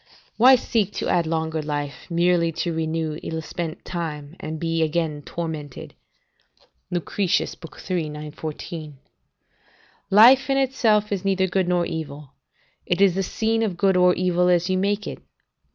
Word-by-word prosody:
["Why 255 +3 +7
seek 220 -4 -1
to - - -3
add 170 -2 +2
longer 160 -1 -1
life, 145 0 -5
merely 170 0 +2
to 170 +1 -2
renew 160 -1 -2
ill 160 - -4
spent 165 0 -6
time, 155 -3 -5
and 155 0 -5
be 165 0 -1
again 155 -2 -1
tormented?" 155 -4 -6 1.0
Lucretius, 180 +2 -1 0.4
iii. 165 -4 -1
914.] 150 0 -7 1.1
"Life 240 +7 +7
in 270 - +2
itself 225 -6 +2
is 200 -2 -2
neither 190 -1 +2
good 185 0 0
nor 175 -1 +1
evil; 150 -4 -6 0.5
it 175 - -1
is 195 -2 +5
the 195 - -1
scene 225 +4 0
of 200 -6 -1
good 195 0 +3
or 180 0 +5
evil 180 0 +2
as 180 +1 +2
you 185 - +1
make 205 +2 0
it. - - -7
175 Hz, 150 wpm, -23 LUFS, 160-195 Hz, 1.1 s, Why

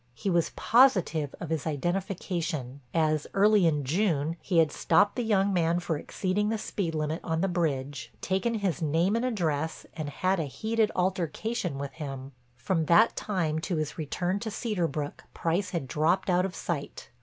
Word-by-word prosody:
He 195 - -2
was 170 -2 +2
positive 185 - +3
of 165 -2 -6
his 160 -2 -1
identification, 170 -4 -2
as 155 -2 +1
early 205 -2 +5
in 150 -3 +1
June 160 0 +1
he 180 - -1
had 160 -2 +5
stopped 205 - +3
the 245 - -1
young 200 -3 +2
man 170 -1 +2
for 175 -2 -2
exceeding 195 +7 -1
the 225 - 0
speed 180 -6 -3
limit 155 +2 -1
on 160 -1 -1
the 195 - +2
bridge, 140 -8 -2
taken 195 +6 0
his 195 -9 -1
name 165 +6 +2
and 230 - 0
address 160 - -1
and 155 -3 -4
had 185 +6 0
a 160 - 0
heated 220 +9 0
altercation 180 - -1
with 140 0 -4
him. 135 -3 -6 0.3
From 160 +6 0
that 195 +8 +5
time 165 -7 -1
to 170 +2 -2
his 155 +1 -3
return 175 +5 -1
to 220 - -4
Cedar 210 -5 -1
Brook 145 -1 -5
Price 180 +3 0
had 170 -8 -3
dropped 160 +7 +1
out 180 +1 +3
of 185 - -10
sight. 150 -5 -5
170 Hz, 180 wpm, -28 LUFS, 155-195 Hz, 0.3 s, early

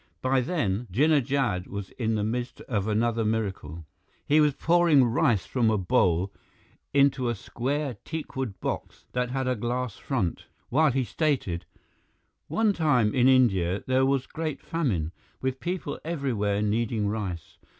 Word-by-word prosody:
By 130 0 +3
then, 120 - -1
Jinnah 145 - +4
Jad 125 -10 0
was 100 -1 -6
in 115 -2 -1
the 105 - 0
midst 120 +3 -3
of 105 -4 -2
another 115 +1 +1
miracle. 95 -8 -3 0.4
He 150 +2 +4
was 150 -3 +3
pouring 165 -5 +4
rice 115 -3 +2
from 120 -4 +1
a 110 - +2
bowl 90 0 +2 0.6
into 140 -3 +3
a 120 - -1
square 135 +4 -3
teakwood 135 - -5
box - - -5
that 125 0 0
had 130 0 -2
a 130 - +1
glass 120 -1 -3
front, 110 - -2 0.2
while 155 +3 +4
he 130 +1 +1
stated: 125 - -1 0.8
"One 220 -2 +2
time, 140 - +2
in 125 -1 +4
India, 100 -9 +3
there 130 0 +2
was 135 -1 +1
great 155 -3 -4
famine, 105 - -1 0.3
with 130 0 -2
people 180 +1 -3
everywhere 115 -11 -1
needing 110 0 0
rice. 100 -6 -4
125 Hz, 150 wpm, -27 LUFS, 105-140 Hz, 0.8 s, Jinnah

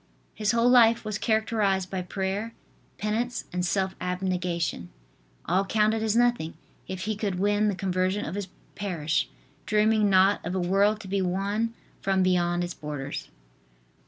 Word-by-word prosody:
His 210 -1 0
whole 235 0 +3
life 235 -2 +5
was 215 -1 -3
characterized 215 -4 +1
by 190 -1 -2
prayer, 195 +5 -3 0.4
penance 225 +3 -2
and 180 0 -1
self 190 +1 0
abnegation. 180 - -2 0.6
All 185 +4 +2
counted 215 +2 +2
as 220 -1 +1
nothing 240 -9 +2 0.3
if 185 -1 -5
he 215 +2 -2
could 200 -3 -2
win 205 +2 +2
the 205 - 0
conversion 185 +2 0
of 155 - -5
his 200 -1 -4 0.3
parish, 160 -7 -1 0.4
dreaming 215 0 +3
not 190 +1 +4
of 175 +3 -3
a - - +1
world 200 +4 +2
to 200 - -10
be 195 +1 0
won 200 +5 -1 0.3
from 190 -1 +2
beyond 175 -1 +2
its 175 0 -4
borders. 145 -2 -5
195 Hz, 155 wpm, -27 LUFS, 180-215 Hz, 0.6 s, life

